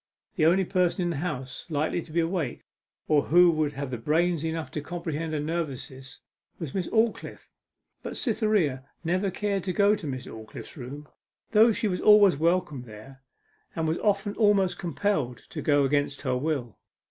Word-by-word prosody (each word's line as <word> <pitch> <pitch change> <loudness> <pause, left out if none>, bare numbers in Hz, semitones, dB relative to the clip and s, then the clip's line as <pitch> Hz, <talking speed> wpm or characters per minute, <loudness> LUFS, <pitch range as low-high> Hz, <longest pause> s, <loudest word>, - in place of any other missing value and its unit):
The 155 -4 +3
only 185 +3 +3
person 180 0 +1
in 175 - 0
the 160 - -3
house 135 -5 -5
likely 155 +2 0
to 160 - -13
be 170 - +1
awake, 165 -6 -2 0.4
or 150 -2 +4
who 175 +1 +6
would 155 -2 0
have 130 -5 -5
brains 165 +2 +1
enough 160 -4 -3
to 150 - -4
comprehend 165 -1 -4
her 155 - 0
nervousness, 135 -4 -5 0.4
was 160 -6 -6
Miss 185 -3 -2
Aldclyffe, 225 0 -1 0.5
but - - -6
Cytherea 210 - +1 0.2
never 185 +4 0
cared 200 0 -2
to 185 - -1
go 205 +3 +4
to 165 - -7
Miss 130 -2 -5
Aldclyffe's 110 -1 -10
room, 145 +2 -8 0.4
though 225 +2 +6
she 220 - -1
was 180 -2 -2
always 210 -4 +7
welcome 165 -2 0
there, 120 +3 -12 0.5
and 160 -1 -1
was 160 +2 0
often 205 0 0
almost 205 -4 +3
compelled 175 - -1
to - - -5
go 145 -1 +3
against 145 0 0
her 130 -3 0
will. 130 -4 -2
160 Hz, 170 wpm, -27 LUFS, 140-185 Hz, 0.5 s, always